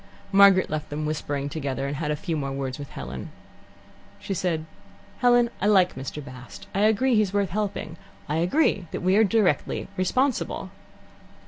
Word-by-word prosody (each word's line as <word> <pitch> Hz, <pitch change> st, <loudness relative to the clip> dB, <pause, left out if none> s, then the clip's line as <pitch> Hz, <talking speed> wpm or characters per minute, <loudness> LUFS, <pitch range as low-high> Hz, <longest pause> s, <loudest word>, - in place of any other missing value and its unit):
Margaret 195 Hz, -1 st, +6 dB
left 155 Hz, 0 st, -4 dB
them 150 Hz, +1 st, -3 dB
whispering 145 Hz, -2 st, -2 dB
together 140 Hz, -2 st, -3 dB
and 140 Hz, +1 st, -3 dB
had 150 Hz, 0 st, -2 dB
a 150 Hz, -, +1 dB
few 165 Hz, +1 st, -3 dB
more 140 Hz, -3 st, -2 dB
words 135 Hz, -1 st, -4 dB
with 140 Hz, -, -7 dB
Helen. 65 Hz, +1 st, -7 dB, 0.9 s
She 195 Hz, -, -4 dB
said: 170 Hz, -3 st, -1 dB, 0.5 s
"Helen, 245 Hz, -1 st, +4 dB
I 205 Hz, -, +2 dB
like 190 Hz, -4 st, +4 dB
Mr. 135 Hz, +2 st, -6 dB
Bast. 125 Hz, -7 st, -11 dB
I 195 Hz, -, -1 dB
agree 220 Hz, +5 st, +3 dB
that -, -, +4 dB
he's 205 Hz, -3 st, +2 dB
worth 200 Hz, -4 st, +1 dB
helping. 200 Hz, -4 st, -3 dB, 0.3 s
I 150 Hz, +1 st, -1 dB
agree 180 Hz, -, +2 dB
that -, -, -5 dB
we 185 Hz, +1 st, +3 dB
are 220 Hz, -, +6 dB
directly 210 Hz, -2 st, +1 dB
responsible." 255 Hz, +9 st, 0 dB
170 Hz, 175 wpm, -25 LUFS, 145-205 Hz, 0.9 s, Margaret